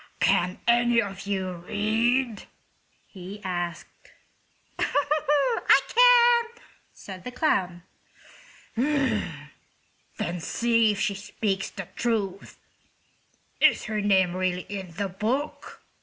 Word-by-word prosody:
"Can 180 -1 +2
any 240 0 +4
of 195 -3 -4
you 190 -2 -2
read?" 220 +5 0 0.6
he 190 +1 -10
asked. 175 -2 -5 0.7
"I 295 - +2
can," 475 -1 +4 0.3
said 190 -2 -11
the - - -5
clown. 185 - 0 0.9
"Then 215 - -4
see 230 +4 +2
if 200 - -6
she 210 -2 0
speaks 200 0 -3
the 190 -3 -8
truth. 205 -5 -2 1.0
Is - - +4
her 215 -1 -2
name 190 -3 +2
really 185 -1 -1
in 195 -3 -6
the 200 +4 -2
book?" 230 +10 -4
205 Hz, 95 wpm, -26 LUFS, 185-245 Hz, 1.0 s, any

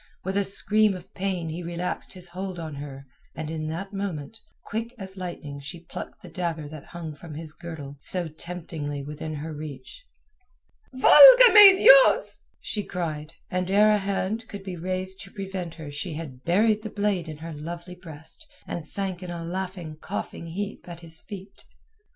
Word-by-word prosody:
With 190 +1 -3
a 200 - +3
scream 210 +1 +4
of 185 +1 -11
pain 185 -4 -2
he 165 +3 -5
relaxed 175 +1 -4
his 180 -1 -9
hold 185 +1 -5
of 160 -2 -5
her 140 -1 -8 0.3
and 155 -1 -4
in 155 -1 -3
that 190 +6 -5
moment, 195 0 -4 0.3
quick 230 +3 -4
as 190 -3 -7
lightning 170 -6 -6
she 160 +5 -8
plucked 165 - -8
the - - -9
dagger 165 -3 -3
that 155 -2 -10
hung 165 -3 -7
from 150 +1 -10
his 155 0 -7
girdle 155 -5 -8
so 175 +3 -2
temptingly 155 -3 -5
within 150 +2 -6
her 155 +2 -5
reach. 150 - -9 0.9
"Valga - - +10
me 405 -3 +11
Dios!" - - +7 0.2
she 210 - -3
cried, 160 -4 -4 0.2
and 185 0 -1
ere 210 +2 +5
a 210 - +3
hand 200 +3 -2
could 200 -1 -8
be 190 -2 -5
raised 185 +2 -3
to 195 - -9
prevent 190 -4 -5
her 155 -3 -8
she 155 +4 -4
had 135 -5 -8
buried 210 +5 +3
the 220 - -5
blade 200 -5 -1
in 155 - -7
her 165 +1 -7
lovely 170 +4 -7
breast 160 -4 -10 0.2
and 160 -3 -5
sank 190 -1 -3
in 180 - -7
a 170 -1 -5
laughing, 180 -3 -5
coughing, 165 - -5
heap 195 +2 -5
at 170 0 -8
his 165 -1 -4
feet. 195 -1 -10
175 Hz, 180 wpm, -26 LUFS, 160-195 Hz, 0.9 s, me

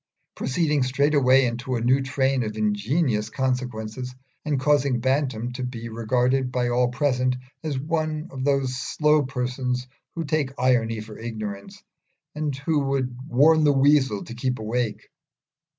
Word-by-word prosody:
proceeding 150 +1 0
straightway 135 0 +3
into 120 +2 -2
a - - 0
new 130 +4 +3
train 130 0 +1
of 110 -2 -4
ingenious 110 +2 0
consequences, 125 -1 -3 0.3
and 145 -3 0
causing 140 -2 +2
Bantam 130 -2 0
to 125 +1 -5
be 115 -2 -5
regarded 125 +3 +1
by 125 -1 0
all 125 +1 +2
present 125 -1 +1 0.3
as 150 -4 -2
one 155 +2 -2
of 130 -1 -5
those 135 -2 +1
slow 150 +3 +2
persons 125 -1 -2 0.3
who 165 - -2
take 145 -3 0
irony 115 -3 +2
for 110 0 -10
ignorance, 110 - -6 0.5
and 150 -2 -2
who 145 +3 0
would 130 -2 -1
warn 155 +5 +5
the 145 - +5
weasel 135 -6 +3
to 115 - -9
keep 125 +1 -2
awake. 110 0 -2
130 Hz, 145 wpm, -24 LUFS, 120-140 Hz, 0.5 s, warn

